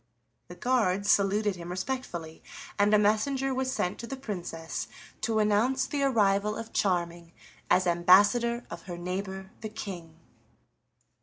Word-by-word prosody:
The 175 - -10
guards 205 -2 +1
saluted 200 0 +2
him 170 0 -8
respectfully, 180 -5 -5 0.4
and 205 +1 +4
a 210 - +6
messenger 260 +6 +1
was 260 0 -1
sent 180 -8 -2
to 235 - -6
the 270 - -5
Princess 175 -9 -5 0.3
to 225 -1 0
announce 220 +6 +2
the 290 - -3
arrival 210 -5 +2
of 225 0 -7
Charming 170 -3 -1 0.4
as 185 +1 +4
ambassador 205 +8 +4
of - - -7
her 175 - -5
neighbor 190 +2 -5
the 215 - -5
King. 180 -7 -7
205 Hz, 140 wpm, -28 LUFS, 180-235 Hz, 0.4 s, a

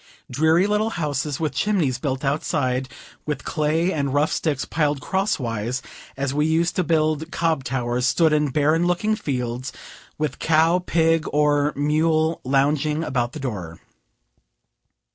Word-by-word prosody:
Dreary 160 +7 +3
little 210 +2 +1
houses, 150 - -2
with 155 -4 -1
chimneys 160 - 0
built 135 0 -2
outside, 130 -2 -1 0.4
with 150 -3 -3
clay 160 +4 0
and 140 -2 -1
rough 150 +2 +2
sticks 145 -5 -1
piled 150 -2 0
crosswise, 130 - -2 0.3
as 140 0 -1
we 150 +2 +1
used 165 +2 +1
to 185 - +2
build 160 0 0
cob 165 -5 0
towers, 125 -1 -1
stood 160 +1 +3
in 150 -1 +2
barren 155 +5 +2
looking 210 +5 +1
fields, 125 - -3 0.5
with 150 -4 -3
cow, 165 +2 +3
pig, 165 -2 +1
or 145 0 +2
mule 155 +2 +1
lounging 145 +3 +1
about 125 -4 -1
the 155 - -6
door. 95 - -5
150 Hz, 140 wpm, -23 LUFS, 135-160 Hz, 0.5 s, Dreary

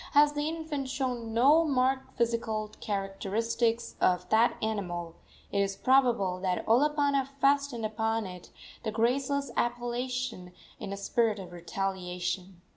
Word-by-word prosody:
As 295 0 +6
the 295 +1 -1
infant 315 -4 -4
showed 250 -4 -2
no 265 +9 +5
marked 265 -3 0
physical 230 -2 -1
characteristics 215 +4 -1
of 180 0 +2
that 225 +2 +4
animal, 175 -6 -3 0.4
it 200 - 0
is 195 0 0
probable 235 -8 +3
that 185 -1 -1
Olopana 280 +2 +3
fastened 275 -4 +2
upon 220 0 -1
it 180 -2 -9 0.3
the 220 - -2
graceless 265 +5 0
appellation 240 -5 -2 0.3
in 200 - -6
a 200 - -4
spirit 220 +2 +1
of 185 -3 -8
retaliation. 180 0 -4
230 Hz, 125 wpm, -29 LUFS, 195-265 Hz, 0.4 s, As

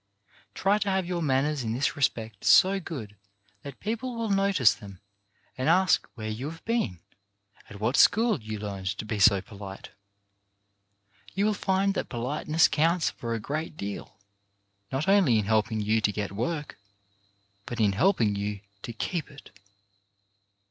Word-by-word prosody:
Try 200 +2 +2
to 205 -1 -1
have 190 -1 0
your 175 -1 -2
manners 145 0 +1
in 110 -1 -2
this 135 +5 0
respect 115 -7 -1
so 195 +1 +6
good 125 - -7 0.5
that 140 +2 -10
people 230 +4 -3
will 230 -2 -2
notice 195 - +4
them 100 -1 -12 0.6
and 130 +4 0
ask 185 +1 +3
where 110 -2 -6
you 115 +7 -4
have 165 +1 -12
been, 225 - -1 0.7
at 100 - -10
what 115 +5 0
school 220 - +4
you 110 0 -5
learned 100 -2 -5
to - - -5
be 105 -1 -3
so 100 -1 +5
polite. 100 -4 -10 1.4
You 200 +2 +1
will 215 - +2
find 195 0 +1
that - - -3
polite 125 +5 -4
ness 155 +1 +5
counts 165 +2 +1
for 115 -1 -4
a - - -3
great 155 +6 -4
deal, 100 0 -6 0.8
not 135 +6 -2
only 190 - +5
in 105 - 0
helping 110 +1 +1
you 110 +2 +1
to 105 - +2
get 105 -1 -4
work, 140 +6 -4 0.9
but 120 - -5
in 105 -2 +4
helping 120 - +2
you 100 0 -3 0.2
to 120 - -6
keep 160 +6 -3
it. 140 - -14
130 Hz, 160 wpm, -27 LUFS, -, 1.4 s, so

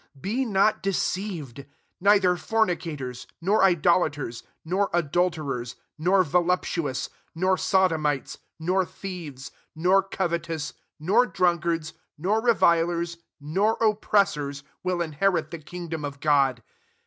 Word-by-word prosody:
Be 230 - -1
not 210 -1 +2
deceived,, 180 - -2 0.4
neither 195 -2 +4
fornicators, 165 - -2
nor 195 +6 +2
idol 175 -1 +4
aters, 135 -5 -6 0.2
nor 190 +4 +1
adulterers, 155 -7 -1 0.2
nor 185 +4 +3
volup 180 +3 +2
tuous, 145 -7 -2 0.3
nor 185 +3 +2
sodomites, 160 -8 +1 0.2
10 160 - -10
nor 185 +2 +2
thieves, 170 -8 -8 0.2
nor 180 +4 +4
covetous, 170 -5 -3 0.3
nor 195 +10 +3
drunkards, 170 -4 0 0.2
nor 200 +8 +1
revilers, 170 -6 +2 0.2
nor 190 +10 +1
oppressors, 195 -10 +1 0.2
will 180 -1 0
inherit 170 +4 0
the 170 - -6
kingdom 165 0 -6
of 145 -1 -5
God. 140 -5 +2
170 Hz, 110 wpm, -25 LUFS, 150-190 Hz, 0.4 s, neither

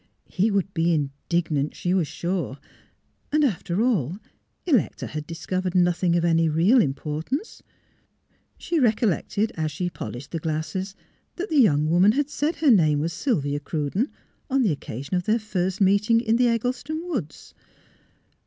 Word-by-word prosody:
He 200 +5 +2
would 195 -2 -1
be 165 0 +1
indignant, 150 +1 -1
she 180 - -1
was 180 -5 +1
sure; 175 -5 -3 0.7
and, 305 0 +3
after 200 - 0
all. 185 - 0 0.5
Electa 280 - +1
had 155 -1 -6
discovered 180 +2 -3
nothing 175 -1 +2
of 170 0 +2
any 165 -1 +3
real 180 +11 +4
im 135 -8 0
portance. 160 - -4 1.0
She 335 - -1
recollected, 220 - +1
as 155 -2 -2
she 175 +4 -3
polished 125 -3 -7
the 165 - -2
glasses, 160 +5 -3 0.4
that 385 +4 -4
the 305 - +4
young 150 - +3
woman 180 +6 +4
had 290 +2 -1
said 310 +2 -1
her 295 -3 +3
name 155 -8 +4
was 165 +3 -2
Sylvia 145 - -1
Cruden, 155 - -2 0.4
on 270 0 +2
the 205 - +2
occasion 140 0 -6
of 180 - -3
their 220 +2 +3
first 190 -3 -2
meeting 200 +4 +4
in 230 -1 +1
the 245 0 +4
Eggleston 250 +7 -1
woods. 230 - -5
180 Hz, 155 wpm, -24 LUFS, 155-230 Hz, 1.0 s, real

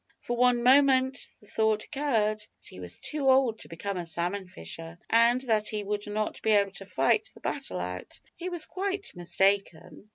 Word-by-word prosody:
For 240 - -3
one 245 0 +3
moment 265 0 +5 0.2
the - - -18
thought 220 0 +1
occurred 225 -8 0
that 210 - -15
he - - -11
was 90 -1 -7
too 285 -3 -1
old 260 -4 +4
to - - -7
become 190 +4 -5
a 175 - -4
salmon 175 +4 -2
fisher, 165 - -8
and 235 +2 +4
that 220 -5 +1
he 210 -1 -3
would 205 +1 -3
not 215 +1 -3
be 220 - 0
able 200 -1 +3
to 195 0 -10
fight 135 -9 +1
the - - -14
battle 90 - -4
out. 90 +1 -6 0.2
He 360 +1 -5
was 345 -3 +3
quite 385 +3 -4
mistaken. 195 +2 0
215 Hz, 190 wpm, -28 LUFS, 190-260 Hz, 0.2 s, moment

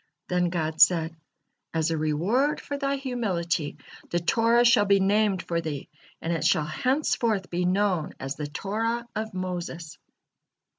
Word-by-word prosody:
Then 180 -1 +1
God 160 -2 -2
said: 165 -2 +5 0.6
"As 160 0 +1
a - - +1
reward 175 - +1
for 285 - -5
thy 280 0 -1
humility, 185 - -2 0.3
the 175 - 0
Torah 230 +7 +3
shall 235 -3 +5
be 200 0 +4
named 200 -1 +2
for 170 -1 -1
thee, 150 -4 -5 0.3
and 165 - 0
it 160 -3 -2
shall 155 -1 +3
henceforth 235 - 0
be 180 +1 0
known 185 -3 +1
as 135 +2 -4
the 150 -2 -4
Torah 225 +9 -2
of 215 -2 -4
Moses." 175 -3 -5
185 Hz, 150 wpm, -26 LUFS, 165-225 Hz, 0.6 s, said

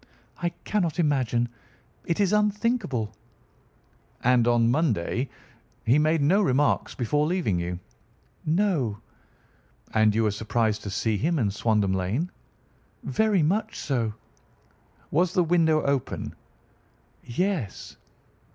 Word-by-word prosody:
"I 175 - +1
cannot 175 -6 0
imagine. 130 -7 +1 0.6
It 170 - -1
is 200 -1 +2
unthinkable." 210 - 0 1.1
"And 120 -1 +4
on 120 -1 +4
Monday 130 - 0 0.6
he 125 +6 +4
made 155 0 +2
no 185 +8 +4
remarks 145 -5 +1
before 145 +5 +1
leaving 160 - 0
you?" 90 +1 -3 0.7
"No." 155 - +1 1.0
"And 110 -1 +4
you 115 - +2
were 105 - +2
surprised 110 +1 0
to 100 - -6
see 110 +2 0
him 165 - 0
in 110 -8 +1
Swandam 105 -2 +1
Lane?" 100 - -1 0.7
"Very 215 -6 +2
much 215 +8 0
so." 115 -6 -1 1.0
"Was 175 +3 +2
the 180 - +4
window 160 -2 +3
open?" 140 -2 -2 0.9
"Yes." 155 - -2
140 Hz, 115 wpm, -26 LUFS, 110-175 Hz, 1.1 s, And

